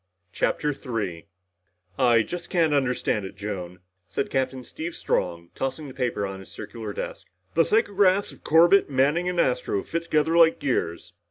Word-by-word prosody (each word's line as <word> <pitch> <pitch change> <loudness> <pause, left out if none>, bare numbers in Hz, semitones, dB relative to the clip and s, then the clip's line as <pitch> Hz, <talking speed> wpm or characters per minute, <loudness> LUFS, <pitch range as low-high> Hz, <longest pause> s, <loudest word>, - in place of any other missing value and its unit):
CHAPTER 150 0 0
3 110 - -4 0.7
"I 120 -3 +5
just 175 +5 -6
can't 165 -4 +2
understand 125 -6 +1
it, 95 +1 -8
Joan," 90 -3 -6 0.3
said 95 - -3
Captain 130 -1 -1
Steve 165 +7 -6
Strong, 85 0 -2
tossing 135 +3 -3
the 130 - -9
paper 120 -6 -1
on 95 0 -6
his 95 - -12
circular 110 -3 -7
desk. - - -6 0.3
"The 165 0 +4
psychographs 200 -3 +3
of - - -19
Corbett, 175 +4 +5
Manning 145 +7 +2
and 180 -1 -2
Astro 405 - +1
fit 170 0 -3
together 155 +1 +2
like 165 -1 +6
gears. 90 -12 -2
135 Hz, 160 wpm, -25 LUFS, 105-170 Hz, 0.7 s, like